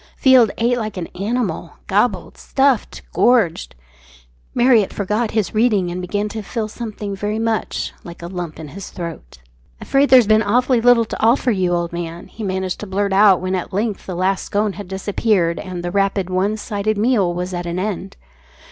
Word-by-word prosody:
Field 255 -4 +6
ate 240 +1 +1
like 215 -3 -4
an 175 - -3
animal 230 +5 -2
gobbled, - - 0
stuffed, 270 -4 0
gorged. 210 - +2 0.8
Marriott 240 -5 +4
forgot 210 +3 -1
his 210 -4 -1
reading, 215 -5 +2
and 180 +1 -4
began 205 +3 -2
to 220 +1 -5
feel 220 +1 -3
something 215 -3 -6
very 205 +2 -2
much 225 -1 -2
like 170 -1 -10
a - - -4
lump 175 -3 -6
in 155 -2 -8
his 195 +5 -8
throat. 165 - -8 0.4
"Afraid 275 +1 +2
there's 255 -3 +7
been 215 +1 +4
awfully 245 +3 +2
little 240 -1 +5
to - - -6
offer 240 +2 +3
you, 185 -4 0
old 170 -1 -1
man," 170 0 -5
he 220 - -8
managed 190 -2 -2
to 210 - -6
blurt 200 +1 -1
out 195 -2 +5
when 185 0 -2
at 185 +1 -3
length 210 +1 -2
the 185 - -4
last 185 +2 0
scone 205 0 0
had 205 -1 -8
disappeared, 190 -2 0
and 180 -3 -6
the 175 - -3
rapid, 195 -1 0
one 195 +4 0
sided 210 0 -2
meal 210 -5 +2
was 180 +1 -4
at 175 0 -4
an 170 +1 -3
end. 185 - -4
205 Hz, 185 wpm, -19 LUFS, 180-225 Hz, 0.8 s, there's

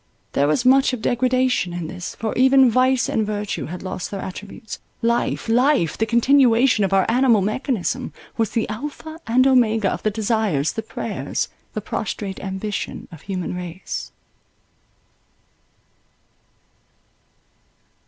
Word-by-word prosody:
There 140 - +2
was 195 - +1
much 265 +1 +5
of 245 - -3
degradation 250 -6 +1
in 175 -1 -4
this: 180 +2 -6
for 220 -1 -3
even 265 -1 +5
vice 255 +1 +3
and 220 - 0
virtue 210 -1 -3
had 175 +3 -7
lost 185 -1 -4
their 200 - -5
attributes—life—life—the 225 - -1
continuation 240 -1 +4
of 195 - 0
our 195 -1 +4
animal 240 -3 +4
mechanism— 245 +3 -2 0.2
was 225 -2 0
the 225 - -1
Alpha 295 +7 -6
and 250 +3 +4
Omega 225 -6 +3
of - - -4
the 215 - +1
desires, 210 - 0
the 225 - -4
prayers, 220 - -3 0.2
the - - -3
prostrate 195 -3 -4
ambition 195 +1 -4
of 160 -3 -11
human 185 -3 -4
race. 180 0 -6
220 Hz, 125 wpm, -22 LUFS, 190-255 Hz, 0.2 s, much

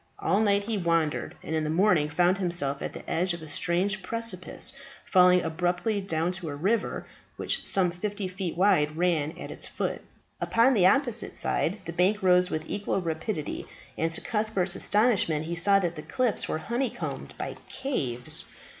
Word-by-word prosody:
All 400 - +1
night 200 -2 +3
he 215 -1 -2
wandered, 165 -3 0
and 160 - -3
in 155 - 0
the 155 - -2
morning 165 -3 +3
found 175 +5 +2
himself 170 -7 -1
at - - -4
the - - -10
edge 175 +1 0
of 170 - -10
a - - -9
strange 180 +6 0
precipice 195 -5 -3 0.3
falling 180 -1 +5
abruptly 175 +6 -1
down 165 -2 0
to 180 -3 -5
a 145 - -4
river, 205 +9 -1 0.3
which, - - 0
some 185 -3 +3
fifty 200 +2 -4
feet 185 -2 -5
wide, 175 -6 +3
ran 165 -3 0
at - - -7
its - - -2
foot. - - -3 0.4
Upon 235 +4 +4
the 190 -6 +5
opposite 240 0 +1
side 190 +5 0
the 170 - -5
bank 190 +4 +2
rose 180 0 +5
with 155 0 -3
equal 205 -1 -1
rapidity, 160 -1 -4 0.3
and 165 - 0
to 165 - -1
Cuthbert's 210 -5 -1
astonishment 205 -8 +2
he 170 +1 -3
saw 195 +4 +4
that 175 -3 -1
the 150 - -6
cliffs 245 +5 -1
were - - 0
honeycombed 240 +8 -4
by - - -5
caves. 130 - -1
180 Hz, 175 wpm, -27 LUFS, 165-205 Hz, 0.4 s, falling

